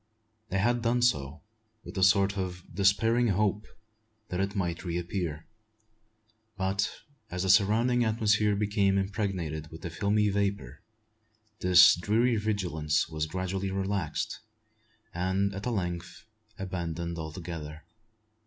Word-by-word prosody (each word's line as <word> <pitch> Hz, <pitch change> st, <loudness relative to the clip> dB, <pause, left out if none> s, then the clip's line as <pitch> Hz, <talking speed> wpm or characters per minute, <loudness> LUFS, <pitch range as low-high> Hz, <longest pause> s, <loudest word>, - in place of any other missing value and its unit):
They 95 Hz, -, -1 dB
had 120 Hz, +5 st, +2 dB
done 120 Hz, +1 st, +1 dB
so, 75 Hz, -, 0 dB, 0.4 s
with -, -, -10 dB
a 95 Hz, -, -1 dB
sort 100 Hz, 0 st, +4 dB
of 90 Hz, -2 st, -4 dB
despairing 110 Hz, +6 st, +3 dB
hope 105 Hz, +1 st, 0 dB, 0.6 s
that 90 Hz, -, -3 dB
it 100 Hz, +1 st, -1 dB
might 85 Hz, -3 st, -2 dB
reappear; 85 Hz, -2 st, -3 dB, 1.1 s
but, 95 Hz, +1 st, 0 dB, 0.4 s
as 90 Hz, +1 st, -3 dB
the 95 Hz, -, +4 dB
surrounding 115 Hz, +5 st, +3 dB
atmosphere 105 Hz, -2 st, +2 dB
became 100 Hz, -1 st, +1 dB
impregnated 95 Hz, -6 st, -2 dB
with 80 Hz, -, -11 dB
the 85 Hz, -, -5 dB
filmy 105 Hz, +4 st, +1 dB
vapour, 100 Hz, 0 st, -2 dB, 0.8 s
this 90 Hz, -1 st, +7 dB
dreary 110 Hz, +7 st, +1 dB
vigilance 90 Hz, -9 st, 0 dB
was 80 Hz, -1 st, -2 dB
gradually 95 Hz, +3 st, -3 dB
relaxed, 95 Hz, -4 st, -2 dB, 0.7 s
and 95 Hz, +3 st, 0 dB
at 100 Hz, +5 st, -5 dB
length 90 Hz, -6 st, -4 dB, 0.3 s
abandoned 85 Hz, -3 st, -4 dB
altogether. 80 Hz, -1 st, -7 dB
95 Hz, 115 wpm, -29 LUFS, 85-105 Hz, 1.1 s, this